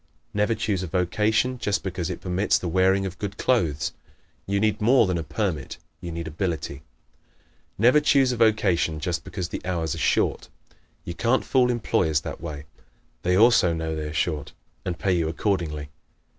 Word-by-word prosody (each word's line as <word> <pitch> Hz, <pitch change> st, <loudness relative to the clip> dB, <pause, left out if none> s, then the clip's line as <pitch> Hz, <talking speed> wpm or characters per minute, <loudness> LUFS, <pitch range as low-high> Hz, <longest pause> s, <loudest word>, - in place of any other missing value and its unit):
Never 105 Hz, +2 st, +1 dB
choose 100 Hz, -5 st, -1 dB
a 95 Hz, -, -4 dB
vocation 105 Hz, +9 st, +1 dB
just 105 Hz, -3 st, -1 dB
because 90 Hz, -3 st, -3 dB
it -, -, -5 dB
permits 95 Hz, +2 st, +1 dB
the 90 Hz, -, -4 dB
wearing 95 Hz, +3 st, +3 dB
of 95 Hz, -2 st, -6 dB
good 100 Hz, -1 st, -4 dB
clothes. 75 Hz, -, +1 dB, 0.5 s
You 100 Hz, +1 st, +1 dB
need 105 Hz, 0 st, +1 dB
more 120 Hz, +2 st, +5 dB
than 90 Hz, -3 st, -1 dB
a -, -, -3 dB
permit; 85 Hz, -, -3 dB, 0.2 s
you 85 Hz, -, -6 dB
need 85 Hz, 0 st, -5 dB
ability. 80 Hz, -4 st, -3 dB, 1.0 s
Never 125 Hz, +8 st, +5 dB
choose 135 Hz, -3 st, +4 dB
a 125 Hz, -, -2 dB
vocation 100 Hz, -8 st, +2 dB
just 85 Hz, +2 st, -2 dB
because 90 Hz, -3 st, -5 dB
the -, -, -5 dB
hours 85 Hz, -3 st, -1 dB
are -, -, -5 dB
short. -, -, +1 dB, 0.6 s
You 85 Hz, -, -4 dB
can't 120 Hz, +8 st, +1 dB
fool 125 Hz, -2 st, +3 dB
employers 85 Hz, -, +1 dB
that -, -, -7 dB
way. 75 Hz, -3 st, -6 dB, 0.6 s
They 90 Hz, +1 st, +2 dB
also 110 Hz, -6 st, +5 dB
know 80 Hz, -1 st, -3 dB
they 75 Hz, -1 st, -4 dB
are -, -, -6 dB
short, 75 Hz, 0 st, -2 dB, 0.3 s
and 90 Hz, -2 st, -2 dB
pay 95 Hz, -1 st, +1 dB
you 85 Hz, -3 st, +1 dB
accordingly. 80 Hz, -5 st, -2 dB
90 Hz, 175 wpm, -25 LUFS, 80-105 Hz, 1.0 s, more